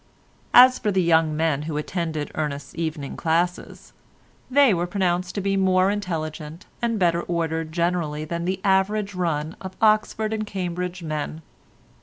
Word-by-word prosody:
As 255 +1 +8
for 210 - 0
the 190 -2 +2
young 160 -2 +3
men 155 -3 +1
who 150 - -2
attended 155 -1 -3
Ernest's 145 -2 -4
evening 160 -4 -4
classes, 170 +2 -2 0.6
they 275 -3 +5
were 175 0 -1
pronounced 180 -1 -1
to 200 - -1
be 195 0 0
more 190 0 +3
intelligent 165 -4 -5 0.2
and 230 -1 0
better 170 -3 +2
ordered 165 -2 -2
generally 170 -3 -1
than 170 +2 -4
the 185 +1 -1
average 200 +1 +1
run 165 -3 -2
of 190 0 -8
Oxford 215 0 +2
and 215 -1 -3
Cambridge 180 -2 -4
men. 155 0 -4
175 Hz, 150 wpm, -23 LUFS, 160-195 Hz, 0.6 s, As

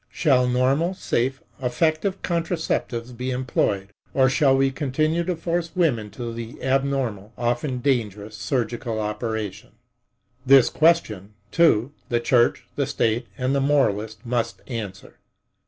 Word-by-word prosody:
Shall 130 -6 +2
normal, 135 +8 +1
safe, 135 -6 -1 0.2
effective 155 +9 0
contraceptives 160 -8 -2
be 125 +2 -4
employed, 120 -6 -1 0.3
or 130 -1 +5
shall 135 -1 +4
we 135 0 +3
continue 155 +4 0
to 180 0 -1
force 170 +1 -2
women 130 -12 +1
to 120 -1 -4
the 115 0 -8
abnormal, 130 -6 -1
often 120 +2 -1
dangerous 110 -5 -1
surgical 115 +2 -2
operation? 110 -1 -4 0.7
This 135 -1 +6
question, 110 - +2 0.2
too, 140 -6 +3 0.2
the 120 - +2
church, 120 0 +2
the 140 -2 0
state 120 -3 0
and 130 +1 0
the 140 - +2
moralist 110 -6 +1
must 120 -1 -2
answer. 110 -7 -7
125 Hz, 125 wpm, -23 LUFS, 115-145 Hz, 0.7 s, This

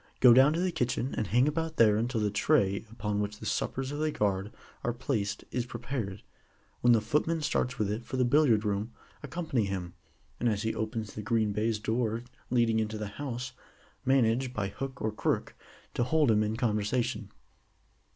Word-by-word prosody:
Go 125 -2 +8
down 135 +4 +7
to 165 - -1
the 185 0 +1
kitchen, 130 -4 -1
and 110 - -1
hang 125 +5 +3
about 160 +1 -2
there 110 -3 +6
until 115 +1 0
the 105 -1 +1
tray 105 -3 +2
upon 105 -2 -2
which 105 0 -3
the - - -9
suppers 135 +1 -1
of 145 - -4
the 155 0 +1
guard 100 -3 0 0.3
are 120 - 0
placed 115 -5 -2
is 125 -1 -2
prepared. 120 -5 -4 0.6
When 120 0 +5
the 115 - +4
footman 150 +8 0
starts 125 -4 0
with 105 -2 0
it 110 +3 -3
for 130 - -5
the 125 - +3
Billiard 120 -5 +4
room, 105 +2 -1 0.3
accompany 160 -10 -1
him, 90 -3 -4 0.5
and 120 - +2
as 105 -1 -1
he 110 - 0
opens 110 -1 -3
the 105 - -5
green 110 0 +1
baize 110 +2 0
door 115 +1 -1 0.3
leading 115 -2 +3
into 110 0 -2
the 105 -1 -4
house, 130 +2 -5 0.5
manage 130 -1 +2
by 100 -2 -1
hook 135 +5 -6
or 110 - +1
crook, 105 - -1 0.4
to - - +1
hold 145 0 +3
him 105 -1 +4
in 110 +1 -1
conversation. 115 +1 0
115 Hz, 190 wpm, -30 LUFS, 105-130 Hz, 0.6 s, Go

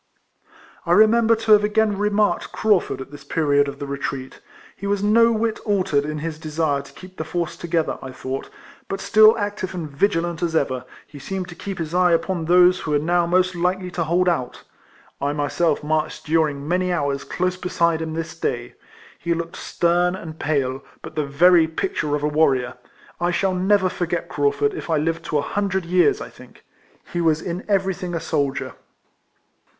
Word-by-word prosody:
I - - +1
remember 225 +1 +5
to 225 0 -1
have 210 -1 +7
again 210 0 +2
remarked 210 +1 +1
Craufurd 205 -10 +1
at 130 - -9
this 145 -1 -11
period 145 -1 +2
of 140 - -6
the 145 - -5
retreat. 140 -1 -5 0.4
He 200 - -6
was 200 0 0
no 230 +3 +5
whit 225 0 -1
altered 185 -9 0
in 155 0 -4
his 160 -2 -5
desire 155 -2 -1
to 140 - -15
keep 185 0 -13
the - - -3
force 170 +1 -3
together, 165 -2 -1
I 130 - -7
thought; 130 +1 -5 0.4
but 195 - -4
still 215 +3 +6
active 205 -3 -3
and 170 -3 -4
vigilant 165 +2 0
as 165 -2 -1
ever, 130 -4 0 0.2
he 145 - -12
seemed 185 +3 -5
to 175 - -9
keep 195 +2 -6
his 165 -2 -4
eye 180 -1 +4
upon 170 0 0
those 180 +2 +5
who - - -6
were 150 - +3
now 170 +3 +1
most 185 +1 +2
likely 180 +1 -1
to 175 -1 -1
hold 175 +3 +2
out. 130 -8 -1 0.6
I 140 +1 0
myself 150 +2 0
marched 155 +1 -2
during 150 -3 0
many 180 +2 0
hours 140 -5 -1
close 185 0 -1
beside 170 -3 0
him 160 -1 -4
this 165 0 -4
day. 120 -6 -3 0.5
He 170 +2 -1
looked 170 0 -5
stern 175 +1 +1
and 160 -4 -9
pale; 135 -3 -1 0.2
but - - -8
the 155 -2 -2
very 165 +3 +5
picture 150 -2 -2
of 145 - -3
a - - +2
warrior. 135 -5 +2 0.5
I 175 +1 +1
shall 185 +2 +1
never 190 +1 +2
forget 175 -1 -3
Craufurd 145 0 +1
if - - -7
I 160 - +2
live 165 +2 -1
to 150 - 0
a - - +2
hundred 195 -3 -1
years, 185 - +3
I - - -6
think. - - -17 0.5
He 175 - 0
was 160 -2 +2
in 175 +2 -5
everything 190 -3 0
a - - -1
soldier. 145 -4 -2
170 Hz, 190 wpm, -22 LUFS, 150-185 Hz, 0.6 s, have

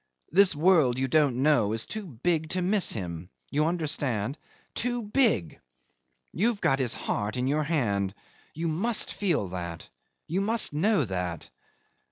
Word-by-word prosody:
This 190 -1 +5
world 155 -6 +4
you 135 0 0
don't 135 -3 +2
know 120 -9 +3
is 110 - -1
too 215 -3 -6
big 160 +4 -1
to 185 +1 -1
miss 195 +1 +2
him. 90 -4 -5 0.2
You 150 +2 +1
understand? 145 - -1 0.4
Too 245 0 -2
big. 210 - +1 0.7
You've 220 +4 +1
got 135 - +2
his 125 -3 0
heart 105 +4 -3
in 125 - 0
your 145 +3 +1
hand. 100 - 0 0.4
You 165 +2 -2
must 205 +9 +1
feel 165 - 0
that. 85 -2 -6 0.4
You 180 +5 -1
must 220 -3 +1
know 180 - +2
that." 90 -4 -4
150 Hz, 150 wpm, -27 LUFS, 110-185 Hz, 0.7 s, This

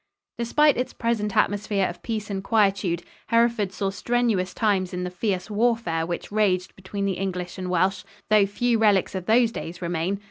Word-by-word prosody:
Despite 295 +6 +3
its 250 - -2
present 220 -3 -1
atmosphere 205 -1 +1
of 175 - -8
peace 215 -3 -4
and 190 -1 -3
quietude, 195 -5 +1 0.2
Hereford 230 -3 +2
saw 195 +1 -2
strenuous 225 -4 0
times 195 -5 0
in 180 - -3
the 180 - -4
fierce 185 0 -2
warfare 215 -7 0
which 175 +3 -5
raged 195 -4 +1
between 200 +1 -4
the 190 -3 -1
English 180 -1 -4
and 185 -1 -4
Welsh, 185 +2 +1 0.3
though 210 -2 +5
few 235 +3 0
relics 205 -4 +3
of 185 -2 -5
those 230 +1 +4
days 175 -6 -6
remain. 175 +2 -2
200 Hz, 175 wpm, -24 LUFS, 185-225 Hz, 0.3 s, though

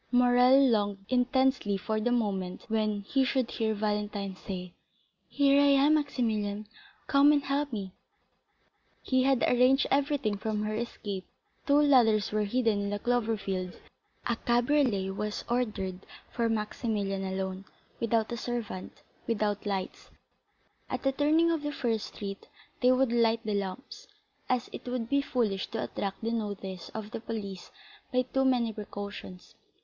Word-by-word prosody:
Morrel 250 +1 +6
longed 205 -4 +1
intensely 255 -4 +2
for 215 +3 -2
the 245 +3 0
moment 195 -6 -1
when 215 -2 0
he 265 +7 +1
should 260 -2 0
hear 220 -1 0
Valentine 210 -2 -2
say, 180 -2 -7 0.5
"Here 280 0 +4
I 285 - +5 0.2
am, 300 +2 +5
Maximilian; 220 -8 0 0.4
come 285 +1 +5
and 290 -1 +2
help 280 +1 -1
me." 195 -5 -5 1.1
He 260 -1 +2
had 265 -1 +2
arranged 255 +2 +4
everything 275 -6 +1
for 220 +1 -3
her 215 0 -1
escape; 210 -4 -4 0.4
two 285 0 +5
ladders 240 -8 +4
were 210 0 +1
hidden 225 -1 +1
in 200 - -2
the 205 - -1
clover 230 0 0
field; 185 -3 -4 0.5
a 235 -1 0
cabriolet 240 -6 +2
was 210 +2 -4
ordered 215 -7 -1 0.3
for 230 -1 0
Maximilian 210 -3 -2
alone, 190 0 -3 0.3
without 230 -1 +1
a 235 - -2
servant, 230 -5 -5 0.2
without 210 -2 -1
lights; 195 -2 -4 0.8
at - - -3
the 270 - +3
turning 310 +4 +3
of 325 -2 0
the 295 0 -3
first 230 -6 -1
street 195 -1 -7 0.3
they 250 0 +5
would 255 -1 +3
light 230 -1 +3
the 215 - -1
lamps, 200 +6 -5 0.4
as 250 -2 +1
it - - -8
would 245 -2 -2
be 280 0 +3
foolish 225 -8 -1
to 225 0 -3
attract 195 +2 -4
the 230 - 0
notice 200 -5 -4
of 215 -1 -5
the - - -4
police 200 -5 -6 0.4
by 255 -1 +2
too 265 +1 0
many 245 -4 +2
precautions. 200 -3 -8
225 Hz, 150 wpm, -29 LUFS, 205-255 Hz, 1.1 s, Morrel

